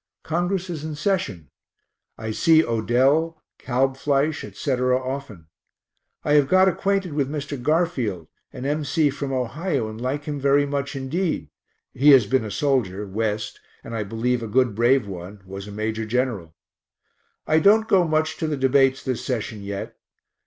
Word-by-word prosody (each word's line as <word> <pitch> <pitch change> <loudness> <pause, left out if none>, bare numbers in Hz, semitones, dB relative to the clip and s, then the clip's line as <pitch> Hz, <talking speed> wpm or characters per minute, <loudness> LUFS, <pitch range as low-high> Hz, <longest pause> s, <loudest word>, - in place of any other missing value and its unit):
Congress 175 +3 -1
is 165 -4 -5
in 155 -1 -4
session; 150 - -2 0.7
I 110 -1 -4
see 160 +8 +4
Odell, 135 +8 +1 0.2
Kalbfleisch, 135 +3 0
etc., 125 -2 0
often. 130 - -6 0.8
I 145 - +1
have 145 -2 +5
got 185 +4 +5
acquainted 190 -1 0
with 140 -2 0
Mr. 145 -2 -5
Garfield, 130 - 0 0.3
an 130 - -7
M. 150 +2 0
C. 145 +1 +2
from 140 0 -4
Ohio, 135 +1 -1
and 110 +1 -8
like 135 +4 -2
him 145 -1 -4
very 140 +1 +3
much 140 0 -3
indeed 155 +7 -2 0.4
(he 140 +4 +4
has 130 -5 +6
been 130 +4 +1
a 110 - -5
soldier 105 -6 0
West, 105 +1 -3 0.2
and 115 - -8
I 110 - -1
believe 115 +4 -1
a 115 - -4
good 120 +1 +2
brave 120 +3 +3
one 95 +2 -8
was 95 +1 -8
a - - -8
major 110 +1 -3
general). 110 -9 -2 0.9
I 155 - +3
don't 215 +6 +5
go 190 -2 +4
much 155 -1 0
to 160 - -2
the 150 -2 -2
debates 135 0 +3
this 130 -3 -3
session 110 -4 -3
yet. 100 0 -6
135 Hz, 160 wpm, -23 LUFS, 110-155 Hz, 0.9 s, has